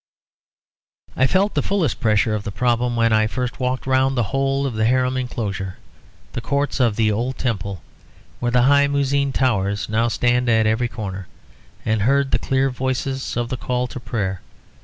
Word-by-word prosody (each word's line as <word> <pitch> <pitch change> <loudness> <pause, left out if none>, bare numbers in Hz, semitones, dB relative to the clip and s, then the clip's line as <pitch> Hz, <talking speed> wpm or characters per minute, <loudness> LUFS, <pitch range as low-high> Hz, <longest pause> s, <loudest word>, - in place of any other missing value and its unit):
I 130 - +3
felt 195 +6 +2
the 145 - +1
fullest 185 - 0
pressure 110 0 +2
of 105 -1 -2
the 105 - -4
problem 120 +3 0
when 115 -1 +3
I 110 0 +3
first 125 +2 -4
walked 130 0 -1
round 130 0 +2
the 120 - +3
whole 135 0 +1
of 135 - -2
the 110 0 0
Haram 130 +2 +2
enclosure, 105 -7 -3 0.6
the 125 - -3
courts 140 +2 -1
of 120 -5 +3
the 110 -1 +2
old 120 +5 -2
Temple, 100 -7 -3 0.6
where 120 - 0
the 125 0 +3
high 140 +2 +5
muezzin 140 0 +1
towers 100 -7 0
now 115 +2 +2
stand 120 +1 +1
at 110 -1 +3
every 110 +3 +1
corner, 95 -5 -6 0.6
and 110 -1 +1
heard 135 +4 +2
the - - +2
clear 135 0 +1
voices 130 +1 -2
of 120 -1 -1
the 130 - -3
call 125 0 -1
to 125 - -7
prayer. 105 -6 -3
125 Hz, 180 wpm, -21 LUFS, 110-130 Hz, 0.6 s, high